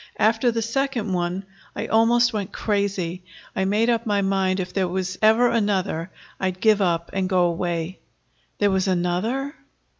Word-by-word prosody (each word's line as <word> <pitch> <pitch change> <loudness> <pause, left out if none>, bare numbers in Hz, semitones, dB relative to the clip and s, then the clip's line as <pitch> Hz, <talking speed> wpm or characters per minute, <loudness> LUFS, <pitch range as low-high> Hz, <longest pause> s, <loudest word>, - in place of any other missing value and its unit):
After 225 +3 +3
the 230 -1 -1
second 235 -3 -1
one 180 +2 -1 0.3
I 210 - -3
almost 235 +2 +3
went 205 -2 -3
crazy. 195 -5 -1 0.3
I 190 - 0
made 210 +4 +2
up 235 -1 +1
my 205 -1 +1
mind, 195 -1 +1
if 180 -1 -4
there 190 -2 +1
was 185 +1 -3
ever 220 +3 +5
another, 195 -6 0 0.3
I'd 185 -1 -2
give 215 0 +4
up 170 -3 0
and 190 -1 -1
go 180 -2 +3
away." 170 0 -2 0.6
"There 205 -1 +2
was 190 0 +1
another?" 190 +10 -1
195 Hz, 160 wpm, -23 LUFS, 185-225 Hz, 0.6 s, ever